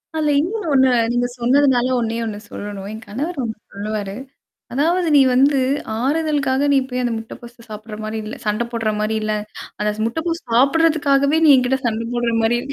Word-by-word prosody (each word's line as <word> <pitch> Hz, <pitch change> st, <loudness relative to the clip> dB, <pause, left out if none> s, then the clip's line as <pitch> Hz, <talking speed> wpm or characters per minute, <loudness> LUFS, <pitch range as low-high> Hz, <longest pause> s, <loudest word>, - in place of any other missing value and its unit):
அதுல 305 Hz, -1 st, +1 dB
இன்னொண்ணு 405 Hz, +2 st, -3 dB
ஒண்ணு, 265 Hz, -1 st, +5 dB, 0.2 s
நீங்க 245 Hz, 0 st, +1 dB
சொன்னதுனால 255 Hz, 0 st, +3 dB
ஒண்ணே 230 Hz, 0 st, -2 dB
ஒண்ணு 210 Hz, -2 st, -4 dB
சொல்லணும். 200 Hz, -1 st, -6 dB
என் 220 Hz, 0 st, -9 dB
கணவர் 285 Hz, +9 st, -4 dB
ஒண்ணு 220 Hz, -2 st, -4 dB, 0.2 s
சொல்லுவாரு. 205 Hz, -1 st, -4 dB, 0.6 s
அதாவது 335 Hz, +6 st, +1 dB
"நீ -, -, +7 dB
வந்து, 275 Hz, +2 st, +4 dB, 0.4 s
ஆறுதலுக்காக 285 Hz, -1 st, 0 dB
நீ 275 Hz, -, +5 dB
போய் 250 Hz, 0 st, -2 dB
அந்த 240 Hz, -1 st, 0 dB
முட்டை 225 Hz, -, -9 dB
பப்ஸ் 235 Hz, -1 st, -14 dB
சாப்பிடுற 215 Hz, 0 st, -8 dB
மாரி 220 Hz, +1 st, -4 dB
இல்ல! 215 Hz, -, -6 dB
சண்டை 210 Hz, +3 st, 0 dB
போடுற 225 Hz, -2 st, -1 dB
மாரி 215 Hz, +1 st, 0 dB
இல்ல! 215 Hz, 0 st, -1 dB, 0.5 s
அந்த 210 Hz, 0 st, +1 dB
ச -, -, -4 dB
முட்டைப்பப்ஸ் 330 Hz, +6 st, -3 dB
சாப்படுறதுக்காகவே 285 Hz, +1 st, +3 dB
நீ -, -, +7 dB
என்கிட்ட 255 Hz, +1 st, +1 dB
சண்ட 225 Hz, 0 st, -1 dB
போடுற 240 Hz, -1 st, 0 dB
மாரி 240 Hz, +2 st, +2 dB
245 Hz, 175 wpm, -20 LUFS, 220-285 Hz, 0.6 s, நீ